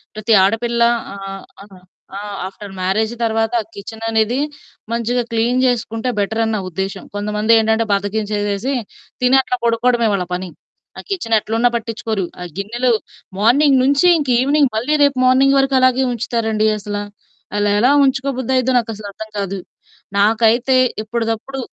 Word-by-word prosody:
ప్రతి 215 +1 0
ఆడపిల్ల 235 +4 0 0.3
ఆహ్, 195 0 -7 0.2
ఆ! - - -10 0.5
ఆ! - - -4 0.3
ఆఫ్టర్ 195 +1 -10
మ్యారేజి 215 +5 0
తర్వాత 225 0 0
ఆ - - -12
కిచెననేది 225 +3 -1 0.5
మంచిగా 235 +1 0
క్లీన్ 235 +3 +1
జేసుకుంటే 235 0 -1
బెటరని 220 +2 0
నా 210 - -1
ఉద్దేశ్యం. 190 +2 -5
కొంతమందేంటంటే 220 +2 +2
బద్ధకించేసేసి 205 +3 -1 0.5
తిని 250 +2 +4
అట్లా 250 -1 -2
పడుకోవడమే 235 0 +2
వాళ్ళ 185 -2 -1
పని. 180 0 -4 0.5
ఆ - - -6
కిచెనెట్లున్నా 230 - +1
పట్టిచ్చుకోరు. 225 -3 -3 0.2
ఆ - - -4
గిన్నెలు 240 +5 0 0.5
మార్నింగ్ 270 +6 +4
నుంచి 280 +6 +3
ఇంక 285 -4 -3
ఈవెనింగ్ 280 0 +2
మళ్ళీ 255 +7 0
రేపు 280 -2 +2
మార్నింగ్ 270 +2 +4
వరకు 270 0 +1
అలాగే 255 +1 +3
ఉంచుతారండి 220 -2 -1
అసల. 205 0 -5 0.6
అలా 205 0 +1
ఎలా 255 - +4
ఉంచుకోబుద్ధి 265 -1 -1
అయ్యిదో 255 +1 +1
నాకసలు 215 -3 -6
అర్థం 220 +2 -9
కాదు. 195 -1 -3 0.6
నాకైతే 225 +5 +3 0.3
ఎప్పటిదప్పుడు 225 +4 -3
225 Hz, 135 wpm, -18 LUFS, 210-250 Hz, 0.6 s, తిని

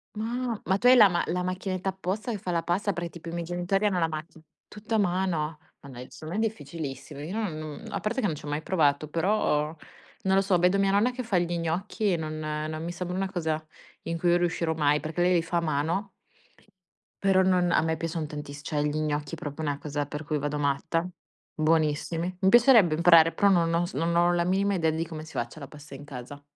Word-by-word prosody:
Ma, 235 +1 -2
ma 190 +2 +2
tu 245 - +2
hai 255 - +9
la 210 -3 +9
ma 175 -2 0
la 180 +1 -1
macchinetta 185 +1 -3
apposta 190 +5 -3
che 215 - -2
fa 185 -2 -4
la 170 -1 0
pasta? 195 +4 0
Perché 170 -1 -4
tipo 170 0 -9
i - - -6
miei 170 -1 -3
genitori 175 +4 0
hanno 195 -3 +2
la 165 -1 +1
macchin 155 +1 -8 0.2
tutto 210 +2 -5
a - - +4
mano? 175 -5 0 0.2
Ma 140 - -13
dai, 125 0 -9
secondo 160 +6 -7
me 225 - +2
è - - +4
difficilissimo. 145 -4 -8
Io 165 +6 -5
no 220 -3 -1
non 155 -1 -7
a - - -3
parte 235 +5 -1
che 210 - +1
non 155 - -2
ci - - -11
ho 145 - -6
mai 145 +1 -2
provato, 155 -4 +1
però 160 -3 +1 0.5
non 190 0 +2
lo 195 - +5
so, 190 -2 +2
vedo 180 +3 +3
mia 195 0 +3
nonna 215 +5 +3
che 255 0 -5
fa 210 -5 0
gli 175 0 0
gnocchi 185 +5 -1
e 170 - +1
non 155 -1 -4
non 155 +1 -3
mi 170 - -3
sembra 180 +1 -4
una 195 0 -2
cosa 160 -3 -2 0.4
in 165 0 -3
cui 175 +1 +3
riuscirò 170 -2 0
mai, 150 -1 +2
perché 160 +2 -3
lei 180 +1 +4
li 170 - +3
fa 170 +1 -2
a - - +2
mano 165 +6 -1 1.1
però 190 -1 +4
non 180 -2 +2
a - - +4
me 160 0 0
piacciono 165 -1 -3
tantis 145 -1 -7
cioè 150 -1 -1
gli 150 +1 -1
gnocchi 150 0 -2
proprio 155 -1 -6
una 145 -1 -1
cosa 145 -1 -3
per 150 +2 -6
cui 150 0 -2
vado 145 +1 -2
matta. 145 +4 0 0.5
Buonissimi. 165 +3 0
Mi 190 - +5
piacerebbe 230 - +6
imparare, 165 -1 +6
però 200 -1 +3
non 170 -3 +3
ho 175 +1 +2
s 180 - -8
non 170 +1 0
ho 175 +1 +4
la 170 0 +2
minima 195 +3 +1
idea 165 -3 +1
di 160 +1 -1
come 155 -1 -7
si 160 - -12
faccia 120 +6 -4
la 140 - -8
pasta 150 0 -13
in 140 +1 -9
casa. 140 +1 -9
170 Hz, 240 wpm, -27 LUFS, 155-190 Hz, 1.1 s, hai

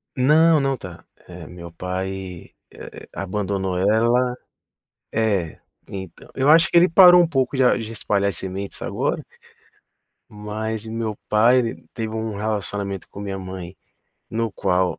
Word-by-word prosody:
Não, 155 +4 +5
não 135 -1 0
tá. 90 -5 -10 0.2
Eh, - - -10
meu 85 -1 -10
pai, 90 0 -5 0.2
eh - - -11
eh, - - -12
abandonou 95 -1 -2
ela 120 +5 +2 0.7
É, 100 -7 -1 0.3
então. 95 -3 -9
Eu 135 +2 +1
acho 160 +1 +7
que 175 - +3
ele 180 +2 +6
parou 180 0 +8
um 170 - +3
pouco 135 -3 0
de 130 - +3
a 125 - +4
de 115 0 -6
espalhar 100 -2 0
as 90 - -6
sementes 95 +1 -6
agora - - -2 1.1
mas 110 +1 -5
e - - -7
meu 110 -1 -3
pai, 115 +4 +5
ele 115 -2 -4
teve 110 -1 -4
um 110 -2 -3
relacionamento 100 -2 -3
com - - -11
minha 100 -1 -4
mãe 95 -1 -8 0.6
no 115 0 -1
qual, 90 0 0
105 Hz, 155 wpm, -22 LUFS, 95-125 Hz, 1.1 s, parou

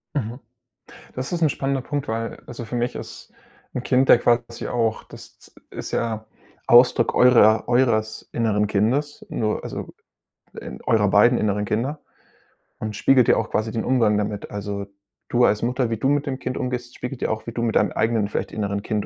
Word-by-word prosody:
Mhm. 120 -2 -3 0.8
Das 130 +1 -4
ist 175 -1 -2
'n 160 - +4
spannender 135 -1 -1
Punkt, 145 +2 -4
weil, 115 +1 -3
also, 120 -1 -7
für 115 - -6
mich 120 0 -1
ist - - -9 0.4
'n 125 - -4
Kind 130 +1 +2
ja - - +9
quasi 120 0 0
auch 115 -2 -1
das - - -15 0.2
ist - - -7
ja 110 -2 -2 0.4
Ausdruck 120 -1 +5
eurer 115 -3 +5
eures 115 -3 +1
inneren 105 -3 +1
Kindes, 125 +9 0
nur, 110 -1 -2
also, - - -6 0.7
in 65 - -9
eurer 110 -4 +2
beiden 110 +5 +5
inneren 105 -1 0
Kinder 125 +9 -2 0.8
und 110 -1 -4
spiegelt 125 +2 +4
ja - - +5
auch 115 - -2
quasi 110 +1 -1
den 110 - -2
Umgang 115 -5 +3
damit. 105 0 -3
Also, 100 0 -4 0.4
du 120 0 +4
als 105 - +2
Mutter, 125 0 0
wie 115 - -2
du 135 +5 0
mit 145 0 +1
dem 135 -2 -4
Kind 130 0 -4
umgehst, 125 -1 -4
spiegelt 125 +1 -6
ja - - 0
auch, 110 +1 -4
wie - - -3
du 115 - -4
mit 115 -2 -1
deinem - - +3
eigenen 110 -2 +1
vielleicht 105 - -3
inneren 100 -1 -2
Kind 105 0 -2
115 Hz, 190 wpm, -23 LUFS, 110-125 Hz, 0.8 s, ja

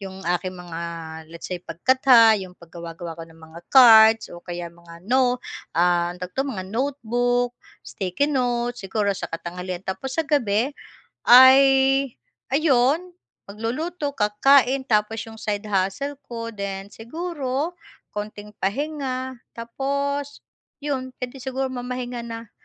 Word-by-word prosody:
yung 190 -1 -8
aking 180 +1 -2
mga 175 -2 -8 0.5
let's 170 - -8
say 180 - -2
pagkatha, 230 - +5
yung 185 -2 -9
paggawa-gawa 170 0 -9
ko - - -6
ng 165 0 -18
mga 160 +1 -12
cards, 225 -3 +8
o 175 - -9
kaya 175 -1 -6
mga 170 0 -15
no 250 -1 +3 0.3
ah, 175 0 +2
ang - - -14
tawag 180 - -4
'to, 270 - +1
mga 200 -9 -4
notebook, 245 -1 0 0.3
sticky 200 +9 -2
note, 245 -3 -1
siguro 200 +1 -1
sa - - -4
katanghalian. 180 +2 -6
Tapos 260 +8 -5
sa 325 - +1
gabi 245 -4 +1 0.5
ay 260 +2 +9 0.9
ayun, 300 +4 +2 0.3
magluluto, 285 - -3
kakakain, 265 +4 +3
tapos 225 -2 0
yung 225 -1 -11
side 205 -1 -3
hustle 200 +9 -1
ko, 230 -1 -6
then 200 -1 -5
siguro 295 +3 -4 0.4
konting 210 0 -7
pahinga 260 +2 -3 0.2
tapos 280 +4 -3 0.4
yun, 260 -3 -3
puwede 250 +1 -7
sigurong 260 0 -3
mamahinga 250 -1 -4
na 230 -1 -8
230 Hz, 130 wpm, -23 LUFS, 190-265 Hz, 0.9 s, ay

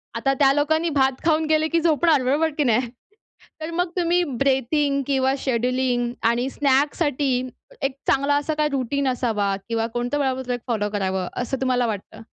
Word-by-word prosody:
आता 270 - +1
त्या 275 -2 +5
लोकांनी 315 +3 +1
भात 270 -3 +2
खाऊन 320 -1 +2
गेले 315 0 +2
की 335 +1 +1
झोपणार 315 -3 +3
बरोबर 295 +5 +2
की 300 - +2
नाही? 240 -1 +1 0.7
तर 315 - -4
मग 355 +1 -1
तुम्ही 350 0 +2
ब्रीथिंग 275 +2 +1
किंवा 265 -1 +2
शेड्यूलिंग 250 -1 0 0.2
आणि 240 +3 +1
स्नॅकसाठी 275 -2 +1 0.3
एक 270 -1 -1
चांगला 280 +1 +2
असा 290 +2 -1
काही 300 0 0
रुटीन 275 0 -1
असावा 220 -6 0
किंवा 225 0 0
कोणतं 245 +4 -1
वेळापत्रक 260 -2 -1
फॉलो 210 -3 -1
करावं 190 -2 -1
असं 260 +2 -3
तुम्हाला 250 -1 +1
वाटतं? 220 +1 -6
270 Hz, 160 wpm, -23 LUFS, 245-295 Hz, 0.7 s, त्या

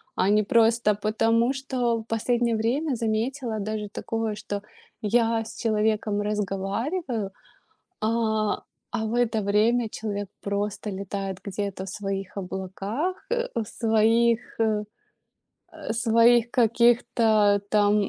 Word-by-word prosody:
А 190 - +2
не 210 +1 +4
просто 225 0 +3
потому, 225 +4 +2
что 250 -4 -1
В - - -8
последнее 235 +1 +1
время 260 +7 0
заметила 225 +1 -1
даже 210 0 -3
такое, 225 0 -3
что 205 -1 -5 0.4
я 225 +1 +2
с - - -10
человеком 215 -2 +1
разговариваю, 210 - -2 0.7
а, 220 -1 +1 0.4
а, 220 -2 -2
в 220 - -3
это 240 -2 +1
время 220 +4 +2
человек 205 -2 -4
просто 205 +1 -2
летает 195 0 -4
где-то 200 -1 -4
в 190 - -6
своих 195 -1 -4
облаках, 195 - -3
э, 485 +1 0
в 230 - -1
своих, 225 +1 +3 0.2
э, 215 -2 +1 0.9
э, - - -5
своих 230 +1 +4
каких-то 225 -3 +3
там. 205 -1 +3
220 Hz, 120 wpm, -25 LUFS, 205-235 Hz, 0.9 s, не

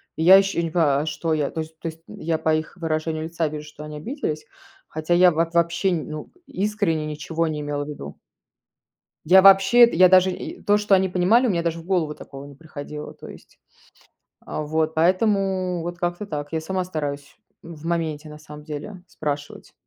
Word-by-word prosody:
И 160 - -2
я 190 +3 +9
ищу, 195 -2 -4
я 170 - +1
не 165 - -3
понимаю: 150 -5 +2
а - - -5
что 160 +1 -2
я? 150 -3 -1
То 160 - -5
есть 160 0 -10
то 165 - -5
есть 160 +1 -12
я 160 -1 -3
по 160 0 +2
их 155 +3 -4
выражению 155 -1 -2
лица 165 0 -2
вижу, 150 0 -7
что 150 0 -11
они 150 0 -7
обиделись, 155 - -4 0.4
хотя 155 +2 -2
я 180 +1 +6
вот 165 +1 -1
вообще, 170 +3 +1
ну, 155 -2 -5 0.2
искренне 195 -6 -1
ничего 155 +2 -2
не 155 -1 -3
имела 145 0 -3
в - - -12
виду. 150 - -8 1.1
Я 190 +4 +7
вообще 195 +5 +7
это, 235 - +2
я 185 +1 +7
даже 185 0 +5
и - - -7
то, 205 0 +3
что 210 -1 +3
они 190 0 +1
понимали, 190 +8 +3
у - - +1
меня 170 -3 0
даже 170 0 -2
в 165 - -11
голову 170 -5 0
такого 140 -1 -11
не 140 - -12
приходило. 150 -1 -8
То - - -12
есть, - - -15 0.8
а, - - -5
вот 160 +1 -1
поэтому 185 0 +1
вот 175 +1 -5
как-то 175 +3 -2
так 145 -6 -5
я 160 - -1
сама 185 +2 -2
стараюсь 145 -4 -5 0.3
в 165 -1 -11
моменте, 160 -3 -2
на 150 - -10
самом 150 -1 -12
деле, 165 +5 -8
спрашивать. 145 -2 -6
165 Hz, 205 wpm, -23 LUFS, 150-185 Hz, 1.1 s, я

